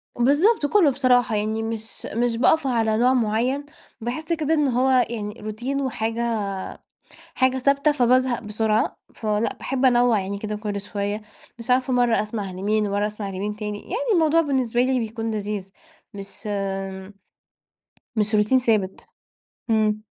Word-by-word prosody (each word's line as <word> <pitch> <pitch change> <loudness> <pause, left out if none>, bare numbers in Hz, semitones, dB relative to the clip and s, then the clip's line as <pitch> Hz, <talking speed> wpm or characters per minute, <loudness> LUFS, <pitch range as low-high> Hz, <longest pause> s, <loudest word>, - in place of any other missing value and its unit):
بالضبط، 290 - +3
كله 325 +1 +4
بصراحة 250 -3 +2
يعني 215 +1 -1
مش 225 0 -6
مش 235 0 0
باقف 285 +3 +3
على 225 -3 +1
نوع 250 +3 +4
مُعيّن، 250 +4 0 0.4
باحس 310 +9 -3
كده 315 -1 0
إن 300 -3 +2
هو 255 +1 +2 0.2
يعني 210 -3 -4
روتين 240 +6 -3
وحاجة 230 -3 -1 0.9
حاجة 260 0 +2
ثابتة 280 +3 +3
فبازهق 255 -2 +2
بسرعة. 215 +2 0 0.2
فلأ، 215 0 -1
باحب 265 0 -1
أنوع 245 -3 +4
يعني 195 +1 -4
كده 210 +1 -4
كل 205 -1 -4
شوية، 205 +1 -3 0.4
مش 230 +2 -9
عارفة 255 +1 +2
مرة 245 -2 +3
أسمع 210 -2 -4
لمين 210 +3 0
ومرة 205 +1 0
أسمع 210 -1 -6
لمين 200 +2 -4
تاني، 210 -1 -5
يعني 470 +4 -2
الموضوع 330 -2 +4
بالنسبة 255 -5 0
لي 255 0 +2
بيكون 225 0 -3
لذيذ، 205 -2 -4 0.4
مش 200 +2 -9 1.7
مش 215 0 +1
روتين 210 +5 +4
ثابت. 215 -6 0 0.6
امم. 215 -1 +2
230 Hz, 145 wpm, -23 LUFS, 210-260 Hz, 1.7 s, كله